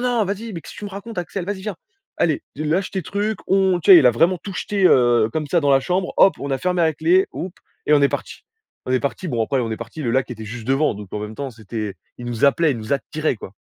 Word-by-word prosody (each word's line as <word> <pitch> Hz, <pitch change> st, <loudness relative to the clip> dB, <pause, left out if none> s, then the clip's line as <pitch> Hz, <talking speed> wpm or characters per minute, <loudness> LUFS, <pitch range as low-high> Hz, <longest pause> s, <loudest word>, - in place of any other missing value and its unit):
non, 245 Hz, -3 st, +1 dB
vas-y, 205 Hz, +3 st, -4 dB
mais 170 Hz, -, -6 dB
qu'est-ce -, -, -12 dB
tu 205 Hz, -, -8 dB
me 205 Hz, -, -6 dB
racontes, 200 Hz, +1 st, -8 dB
Axel? 180 Hz, +1 st, -4 dB
Vas-y, 200 Hz, +1 st, -4 dB
viens! 210 Hz, -1 st, -4 dB, 0.4 s
Allez! 155 Hz, -4 st, +1 dB
Tu 155 Hz, -, -4 dB
lâche 175 Hz, +6 st, 0 dB
tes 190 Hz, -, -2 dB
trucs, 205 Hz, +5 st, -2 dB
on», 190 Hz, -2 st, +3 dB
tu 185 Hz, -, +2 dB
sais, 180 Hz, -, +12 dB
il 135 Hz, -, +5 dB
a -, -, +7 dB
vraiment 170 Hz, +9 st, +2 dB
tout 200 Hz, -, -7 dB
jeté, 200 Hz, 0 st, -1 dB
heu, 120 Hz, -6 st, +4 dB
comme 155 Hz, -1 st, -2 dB
ça, 175 Hz, -, +2 dB
dans 145 Hz, -2 st, +2 dB
la 135 Hz, -, +5 dB
chambre, 180 Hz, +5 st, -1 dB
hop, 195 Hz, -, +6 dB
on 140 Hz, -, -5 dB
a 135 Hz, -, 0 dB
fermé 180 Hz, +1 st, 0 dB
a 160 Hz, -1 st, +3 dB
clé, 170 Hz, +5 st, +3 dB
houp 180 Hz, +1 st, -5 dB, 0.3 s
et 150 Hz, -, +3 dB
on 145 Hz, -, +6 dB
est 140 Hz, -, +5 dB
partis. -, -, -6 dB, 0.4 s
On 130 Hz, -, -1 dB
est 130 Hz, -, +2 dB
partis. 145 Hz, +6 st, -3 dB
Bon, 115 Hz, -4 st, 0 dB
après, 135 Hz, -, -1 dB
on 115 Hz, -2 st, -2 dB
est 110 Hz, -, -3 dB
partis, 115 Hz, +7 st, -8 dB
le 120 Hz, -, -1 dB
lac 130 Hz, 0 st, +1 dB
était 110 Hz, -2 st, -7 dB
juste 110 Hz, +1 st, -8 dB
devant, 135 Hz, -1 st, +2 dB
donc 100 Hz, -1 st, -9 dB
en 105 Hz, -, -3 dB
même 105 Hz, +1 st, -6 dB
temps, 140 Hz, +1 st, -5 dB
c'était 110 Hz, -2 st, -6 dB, 0.2 s
il 120 Hz, -, -7 dB
nous 120 Hz, 0 st, -1 dB
appelait, 150 Hz, +3 st, +4 dB
il 120 Hz, -, -5 dB
nous 110 Hz, +5 st, -5 dB
attirait, 150 Hz, +1 st, -1 dB
quoi. 95 Hz, -, -10 dB
155 Hz, 285 wpm, -21 LUFS, 120-190 Hz, 0.4 s, sais